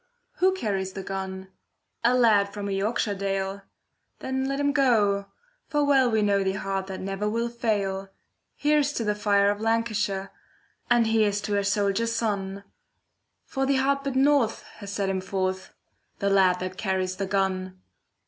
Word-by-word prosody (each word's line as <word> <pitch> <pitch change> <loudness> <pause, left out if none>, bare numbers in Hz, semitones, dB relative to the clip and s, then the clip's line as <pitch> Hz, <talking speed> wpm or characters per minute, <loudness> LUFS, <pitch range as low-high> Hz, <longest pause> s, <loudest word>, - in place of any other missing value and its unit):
Who 375 +1 +3
carries 195 - -2
the 195 - -6
gun? 190 -1 -5 0.5
A 240 +2 +4
lad 210 -5 +4
from 205 0 -5
a - - -3
Yorkshire 205 +2 0
dale. 195 0 -2 0.6
Then 265 0 -2
let 275 +1 -2
him 285 0 +2
go, 215 -8 +2 0.4
for 295 -1 +1
well 270 -3 +4
we 220 -2 +2
know 200 -1 +2
The 190 0 0
heart 195 0 -3
that 190 -1 -6
never 195 +2 -2
will 230 +2 -1
fail. 200 -5 -1 0.5
Here's 295 -1 +2
to 235 - -2
the 210 -1 +1
fire 205 -1 +3
of 205 +1 -5
Lancashire, 215 -4 0 0.6
And 240 -1 +4
here's 215 -2 +2
to 205 0 -3
her 200 0 +1
soldier 200 +2 +1
son! 200 -4 -2 0.8
For 270 0 -2
the 275 - +3
hard 275 +1 +2
bit 275 -1 -3
north 270 -4 +3
has 200 -2 -8
sent 200 -1 -1
him 190 -1 -2
forth— 190 0 -2 0.5
The 200 0 0
lad 185 -2 +4
that 185 0 -5
carries 185 -2 -1
the 195 0 -2
gun. 185 -1 -1
205 Hz, 165 wpm, -26 LUFS, 195-235 Hz, 0.8 s, A